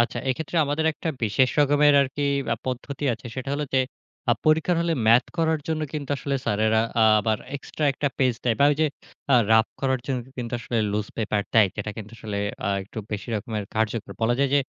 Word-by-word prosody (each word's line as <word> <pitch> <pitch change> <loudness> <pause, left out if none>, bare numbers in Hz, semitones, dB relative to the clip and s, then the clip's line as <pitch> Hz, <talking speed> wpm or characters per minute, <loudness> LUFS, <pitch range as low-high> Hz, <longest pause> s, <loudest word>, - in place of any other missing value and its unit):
আচ্ছা। 120 - +1
এক্ষেত্রে 155 +6 -2
আমাদের 145 +2 -1
একটা 165 - -5 0.2
বিশেষ 120 +5 +2
রকমের 145 0 +5
আরকি 140 +2 -3 0.3
আ - - +2
পদ্ধতি 135 +3 -4
আছে। 120 - -12
সেটা 130 0 -4
হলো 150 +1 -1
যে, - - +5 0.5
আ - - +7
পরীক্ষার 160 +3 +3
হলে 170 0 +1
ম্যাথ 115 +3 +6
করার 160 -2 +1
জন্য 160 -1 -1
কিন্তু 145 -3 -5
আসলে 140 0 -2
স্যারেরা 110 +1 +2
অ্যা 115 -2 +4 0.2
আবার 110 +1 0 0.2
এক্সট্রা 150 +2 -5
একটা 145 +2 -1
পেজ 130 -2 +3
দেয় 120 - +2
বা - - +7
ওই 145 - +1
যে 155 - +4 0.5
আ - - +7 0.2
রাফ 110 +1 +5
করার 130 -2 +1
জন্য 135 -2 -1 0.2
কিন্তু 120 -1 -4
আসলে 115 +1 -2
লুজ 105 0 -1
পেপার 105 -2 0
দেয়। 110 -4 +6
যেটা 105 0 -3
কিন্তু 110 0 -8
আসলে 105 -2 -4 0.2
অ্যা 100 - -2
একটু 100 +3 -9
বেশি 105 +3 -5
রকমের 105 0 -4
কার্যকর। 110 0 -1
বলা 115 +2 +3
যায় 140 -1 +2
যে, 145 - +5
130 Hz, 210 wpm, -24 LUFS, 110-145 Hz, 0.5 s, আ